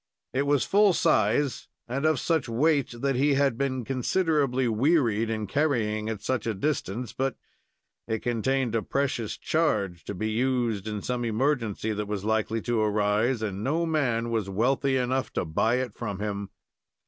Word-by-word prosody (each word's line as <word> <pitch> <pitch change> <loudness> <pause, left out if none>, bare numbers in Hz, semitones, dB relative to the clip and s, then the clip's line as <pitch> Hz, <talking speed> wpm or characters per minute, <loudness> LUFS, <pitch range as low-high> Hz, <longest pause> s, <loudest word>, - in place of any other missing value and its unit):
It 140 +2 0
was 145 -2 +3
full 205 -1 +4
size, 120 +2 +2 0.2
and 135 +5 0
of 155 -4 +2
such 160 -5 0
weight 135 -1 +1
that 135 -1 +1
he 140 +2 +3
had 140 -3 +2
been 130 -1 -2
considerably 135 - +1
wearied 115 -2 +2
in 110 -1 -2
carrying 110 -4 0
it 110 -2 -4
such 125 -4 -1
a 110 - -1
distance, 120 -2 -2
but 135 0 -1 0.7
it 110 -1 -2
contained 120 +1 0
a 115 - +1
precious 130 -4 -2
charge, 105 - 0
to 100 - -5
be 110 +4 -2
used 120 -3 0
in 105 -2 -4
some 125 -1 -2
emergency 115 -2 0
that 105 0 -3
was 105 -1 -3
likely 110 0 0
to 120 -2 0
arise, 105 +3 +1
and 100 -1 -3
no 160 +7 +1
man 120 -8 0
was 110 -4 -1
wealthy 130 +6 +1
enough 130 +1 -1
to - - -1
buy 110 +9 +1
it 125 -4 -2
from 105 -4 -4
him. 100 -1 -4
120 Hz, 170 wpm, -27 LUFS, 110-135 Hz, 0.7 s, full